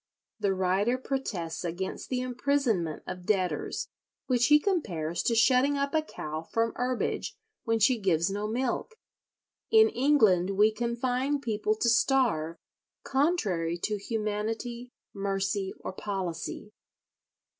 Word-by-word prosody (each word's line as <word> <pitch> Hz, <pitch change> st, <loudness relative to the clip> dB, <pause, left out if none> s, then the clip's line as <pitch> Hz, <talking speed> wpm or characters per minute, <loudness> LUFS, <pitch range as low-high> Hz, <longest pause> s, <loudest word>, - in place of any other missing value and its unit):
The 200 Hz, -2 st, +1 dB
writer 190 Hz, +6 st, +1 dB
protests 205 Hz, -12 st, -3 dB
against 180 Hz, +2 st, -4 dB
the 250 Hz, -1 st, -1 dB
imprisonment 250 Hz, -, 0 dB
of 180 Hz, -1 st, -7 dB
debtors, 190 Hz, -4 st, -1 dB, 0.4 s
which 245 Hz, -2 st, +2 dB
he 295 Hz, -, +7 dB
compares 180 Hz, -, -1 dB
to 230 Hz, -, +1 dB
shutting 255 Hz, +5 st, +4 dB
up 280 Hz, 0 st, -1 dB
a 315 Hz, -, +3 dB
cow 155 Hz, -, -6 dB
from 230 Hz, +7 st, -1 dB
herbage 250 Hz, 0 st, -2 dB, 0.3 s
when 225 Hz, -1 st, +2 dB
she 230 Hz, +3 st, +3 dB
gives 170 Hz, -5 st, +2 dB
no 205 Hz, +1 st, -2 dB
milk. 250 Hz, -, -2 dB, 0.7 s
"In 440 Hz, 0 st, +6 dB
England 215 Hz, -, +3 dB
we 210 Hz, +2 st, +5 dB
confine 245 Hz, +5 st, -1 dB
people 215 Hz, -4 st, -1 dB
to 225 Hz, -, 0 dB
starve, 230 Hz, -, +2 dB, 0.5 s
contrary 210 Hz, -, 0 dB
to 210 Hz, -1 st, 0 dB
humanity, 225 Hz, +3 st, -3 dB, 0.2 s
mercy, 195 Hz, 0 st, -1 dB
or -, -, -5 dB
policy. 190 Hz, 0 st, -4 dB
220 Hz, 125 wpm, -28 LUFS, 190-255 Hz, 0.7 s, he